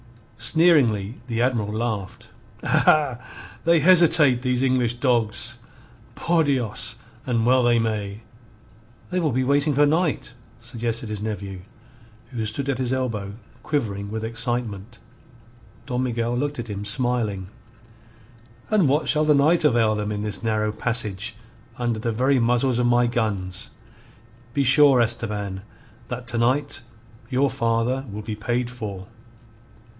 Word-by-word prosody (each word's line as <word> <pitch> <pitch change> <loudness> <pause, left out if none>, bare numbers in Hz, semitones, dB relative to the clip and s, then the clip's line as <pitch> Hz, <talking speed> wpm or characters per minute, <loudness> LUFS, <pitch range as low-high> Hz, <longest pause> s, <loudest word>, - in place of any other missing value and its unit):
Sneeringly 120 - +2
the 115 -1 0
Admiral 115 -5 0
laughed. 110 -4 -4 0.3
"Aha! 145 -6 +3 0.4
They 170 0 +4
hesitate, 165 -7 +6
these 125 0 0
English 125 -3 +1
dogs! 120 -2 0 0.6
Por 170 -1 +1
Dios, 120 -5 -1 0.3
and 115 -3 +1
well 130 +1 +4
they 120 -1 +3
may." 105 -2 -2 0.9
"They 180 - 0
will 160 -4 0
be 130 +2 0
waiting 140 +2 +1
for 145 +1 +5
night," 155 -4 0 0.3
suggested 120 -1 -4
his 105 -1 -5
nephew, 100 -3 -5 0.7
who 120 -3 -3
stood 130 +6 -3
at 135 -2 -1
his 130 -1 -1
elbow 115 -7 -2 0.3
quivering 100 -9 -3
with 110 +1 -4
excitement. 115 -2 -2 0.9
Don 125 0 -2
Miguel 120 -1 -1
looked 145 +3 -2
at 120 -1 -5
him, 100 0 -5
smiling. 105 -4 -1 1.2
"And 200 -9 +3
what 150 +3 +1
shall 155 0 +4
the 150 -1 +4
night 155 +5 +3
avail 115 -6 +3
them 105 0 -3
in 105 0 -3
this 105 -2 -2
narrow 110 -1 0
passage, 110 -2 -1 0.4
under 120 -2 -1
the 115 +1 -2
very 130 +4 +2
muzzles 125 +1 +1
of 120 - +2
my 120 0 +3
guns? 105 -6 -2 0.9
Be 140 - +2
sure, 140 0 +6
Esteban, 105 -4 -1 0.5
that 125 0 -6
to 120 - -1
night 130 +3 0 0.5
your 135 +1 +1
father 120 +1 0
will 105 +1 -6
be 110 0 -5
paid 120 +3 -2
for." 105 -6 -7
120 Hz, 140 wpm, -23 LUFS, 110-130 Hz, 1.2 s, hesitate